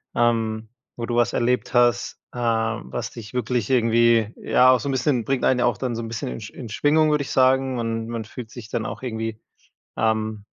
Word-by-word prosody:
ähm, 115 -2 +1 0.3
wo 120 - -4
du 120 - -2
was 120 - +2
erlebt 125 0 0
hast, 120 0 +2
äh, - - -11
was 115 - -1
dich 110 -2 -10
wirklich 125 -2 -1
irgendwie, 115 -2 +3
ja, 130 0 +4
auch 130 - +4
so 140 - -5
'n - - 0
bisschen 125 -3 +1
bringt 135 -2 -1
einen 125 -1 +3
ja - - +2
auch 120 -4 +1
dann 125 -3 -2
so - - -3
'n 115 - -5
bisschen 110 - -4
in 60 - -5
in 115 - -8
Schwingung, 155 +6 +3
würde 150 -1 +1
ich - - -7
sagen 130 0 +3
und 115 -1 -2
man 115 -1 -4
fühlt 110 +1 -9
sich 120 -3 -10
dann 110 - -2
auch - - -6
irgendwie 115 -3 -4 0.6
ähm, 110 -1 -1
120 Hz, 215 wpm, -23 LUFS, 110-125 Hz, 0.6 s, ja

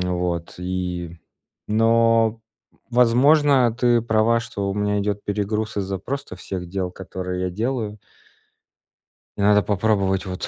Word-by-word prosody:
вот, 90 -2 -2
и 90 -2 -4 0.5
но, 115 0 +3 0.5
возможно, 125 +1 +4
ты 120 -1 +2
права, 115 +1 +2
что 105 -4 -4
у - - -3
меня 105 0 0
идет 100 0 -2
перегруз 105 +1 -2
из-за 95 -1 -2
просто 135 0 -5
всех 90 -2 -6
дел, 90 -1 -3
которые 90 -1 -5
я 90 - -1
делаю. 110 +1 -3 1.4
И 100 - -4
надо 105 0 +4
попробовать, 100 -1 +1
вот, 95 0 -4
105 Hz, 125 wpm, -22 LUFS, 95-115 Hz, 1.4 s, возможно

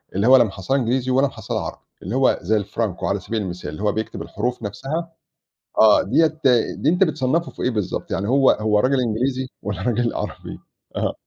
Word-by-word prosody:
اللي 100 +5 +1
هو 130 0 +8
لا - - +6
مَحصّلة 100 +5 -2
إنجليزي 130 +1 0
والّا 135 +2 +3
مَحصّلة 110 -5 -4
عربي، - - -7 0.2
اللي - - -4
هو - - +3
زي 110 +5 +1
الفرانكو 100 -2 -3
على 100 - 0
سبيل 110 +3 -3
المثال، 90 -5 -5
اللي 75 +6 -8
هو 105 - +3
بيكتب 110 +1 -4
الحروف 120 +2 -3
نفسها، 155 - -4 0.7
آه، 110 -1 +6
دِيّة 160 -1 +1 0.4
دي 150 - +1
أنت 180 +3 +3
بتصنّفه 155 +1 0
في - - -10
إيه - - +1
بالضبط؟ 105 -6 -3
يعني 100 +2 -1
هو 135 +1 +4
هو 110 -1 +1
رجل 130 +3 +2
إنجليزي؟ 125 +3 -1
والّا 100 -2 -4
رجل 120 +2 0
عربي؟ - - -6 0.4
آه. - - -1
120 Hz, 195 wpm, -21 LUFS, 105-135 Hz, 0.7 s, هو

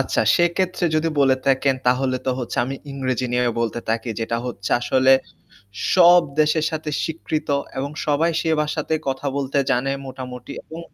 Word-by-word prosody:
আচ্ছা - - +1
সেক্ষেত্রে 175 +1 +1
যদি 155 +1 +2
বলে 135 -1 +5
থাকেন 135 0 +3
তাহলে 130 +1 +2
তো - - +2
হচ্ছে 120 - -5
আমি 135 +2 -4 0.2
ইংরেজি 130 -2 -2
নিয়ে 125 0 +2 0.2
বলতে 115 0 -1
থাকি। 115 +1 -1
যেটা 115 +1 -1
হচ্ছে 100 -5 -5
আসলে 130 +2 +4 0.8
সব 175 -1 +7 0.2
দেশের 155 +1 +2
সাথে 155 -1 -4
স্বীকৃত 155 -1 -3 0.3
এবং 140 +2 -2 0.2
সবাই 155 +3 +2
সে 165 - -2
ভাষাতে 155 +1 -1
কথা 135 +1 -3
বলতে 140 0 -1
জানে 135 +1 +1
মোটামুটি 125 -1 -8
এবং 160 +1 -9
135 Hz, 160 wpm, -22 LUFS, 125-155 Hz, 0.8 s, সব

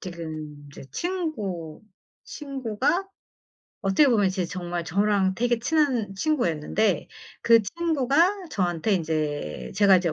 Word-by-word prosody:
지금 160 -4 -7
이제 - - -11
친구 220 - -3 0.4
친구가 275 - -2 0.7
어떻게 195 +9 +4
보면 210 -5 +3
이제 185 -1 -2
정말 175 -1 -4
저랑 195 +1 +1
되게 240 +2 +1
친한 255 -7 +1
친구였는데 195 - 0 0.3
그 230 -1 +6
친구가 335 - +1
저한테 180 - 0
인제 155 -4 -2
제가 200 -1 +6
이제 175 -3 0
205 Hz, 250 characters per minute, -25 LUFS, 175-275 Hz, 0.7 s, 그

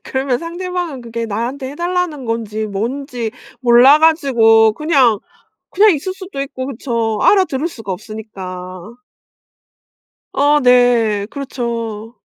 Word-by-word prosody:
그러면 265 -2 -1
상대방은 345 -2 -5
그게 230 -1 -5
나한테 250 +6 -4
해달라는 345 -3 -2
건지 220 -2 -3
뭔지 235 +3 -4 0.3
몰라 250 +4 +6
가지고 235 -9 +4
그냥, 265 -6 +2 0.5
그냥 420 +3 +5
있을 340 +6 -4
수도 375 -6 -7
있고 270 -1 -5
그쵸. 230 -4 -2
알아들을 340 -7 +3
수가 225 - -8
없으니까. 190 +1 -8 1.3
아 290 +1 +3
네 240 -5 +3
그렇죠. 235 -4 -5
245 Hz, 255 characters per minute, -17 LUFS, 225-290 Hz, 1.3 s, 몰라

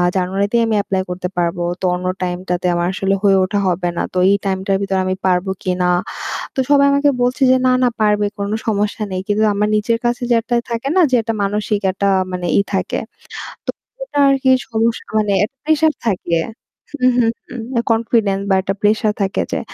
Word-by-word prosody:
জানুয়ারিতেই 195 +5 +1
আমি 220 - +1
এপ্লাই 190 -2 -1
করতে 180 0 -3
পারবো। 175 0 0 0.2
তো - - -1
অন্য 180 0 -6 0.2
টাইমটাতে 180 0 -3
আমার 175 0 0
আসলে 195 +1 0
হয়ে 195 -1 +5
ওঠা 200 +2 -1
হবে 175 0 0
না। - - 0
তো 185 - -3
এই 200 - +5
টাইমটার 195 0 0
ভিতরে 195 -1 0
আমি 185 0 -1
পারবো 180 +1 +1
কিনা। 180 -1 0 0.7
তো - - -13
সবাই 280 -1 +5
আমাকে 285 +1 +3
বলছে 250 +3 0
যে 260 - +6
"না, 255 - +4
না - - +4
পারবে। 210 -1 +2
কোন 200 0 -2 0.2
সমস্যা 210 0 -1
নেই।" 185 - -2
কিন্তু 210 +1 +2
আমার 210 +1 +1
নিজের 230 +2 +1
কাছে 240 +1 0
যে - - +5
একটা 240 +1 -2 0.2
থাকে 235 +3 -2
না - - +6
যে - - +1
একটা 225 0 -2
মানসিক 210 +1 -1
একটা 200 +1 0 0.2
মানে 180 -1 -3
ই - - +6
থাকে। - - -1 0.7
তো - - +1 0.3
ওটা - - -4
আরকি 270 -1 +2 0.2
সমস্যা 225 0 0
মানে 210 -1 +1
একটা 270 +6 -8
প্রেশার 315 0 +3
থাকে। 180 -5 0 0.6
হু, 255 -3 +1
হু, 240 - +4 0.2
হুম। 245 - -7 0.3
Confidence 225 -3 +1
বা - - +5
একটা 195 +1 -2
প্রেশার 210 0 +2
থাকে 195 0 0
যে - - -1
205 Hz, 195 wpm, -18 LUFS, 185-230 Hz, 0.7 s, যে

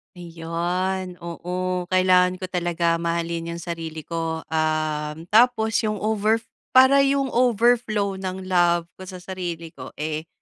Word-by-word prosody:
Ayun, 175 +2 -3
oo 180 +1 -3
kailangan 185 0 +4
ko 185 - -11
talaga 170 -1 0
mahalin 170 0 -2
yung 170 - -8
sarili 165 -2 -6
ko, 165 0 -3
um, 155 -1 -1
tapos 220 0 +4 0.2
yung 215 - -1
over 215 0 +2 0.4
para 260 +2 +7
yung 275 -1 +2
overflow 230 -4 +2
ng 190 0 -5
love 175 -2 +2
ko 185 - -9
sa 185 -1 -9
sarili 175 -3 -5
ko, 130 -3 -11
eh, 155 +1 -4
180 Hz, 135 wpm, -23 LUFS, 165-190 Hz, 0.4 s, para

